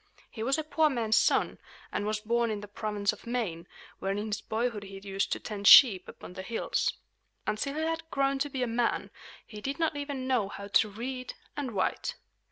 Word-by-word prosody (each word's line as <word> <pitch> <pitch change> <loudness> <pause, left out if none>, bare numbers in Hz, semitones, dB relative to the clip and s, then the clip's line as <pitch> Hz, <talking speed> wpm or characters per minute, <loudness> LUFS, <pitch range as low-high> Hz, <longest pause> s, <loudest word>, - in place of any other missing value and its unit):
He 220 - -7
was 270 +6 +1
a 315 - -1
poor 310 0 +3
man's 230 -5 +1
son, 215 - +3 0.3
and 205 - -2
was 215 0 -1
born 235 +1 +1
in 210 -2 -3
the 205 - -8
province 205 0 -1
of - - -14
Maine, 195 -9 -2 0.3
where 195 - -1
in 200 - -1
his 210 -2 -3
boyhood 225 -1 -1
he 195 -1 -9
used 195 0 -2
to - - 0
tend 205 -2 -3
sheep 210 -10 +9
upon - - -10
the 190 - -6
hills. 225 +4 -1 0.5
Until 220 +7 -1
he 310 - -1
had 325 0 -2
grown 275 -2 +1
to 290 +1 0
be 260 -2 -2
a - - 0
man, 235 0 0 0.3
he 210 -1 -10
did 275 +5 -3
not 325 -2 +1
even 285 -2 -4
know 245 -7 +1
how 200 0 -8
to 215 +1 +4
read 255 +5 -5 0.2
and 275 -5 -3
write. 190 -2 -1
230 Hz, 210 wpm, -29 LUFS, 205-270 Hz, 0.5 s, sheep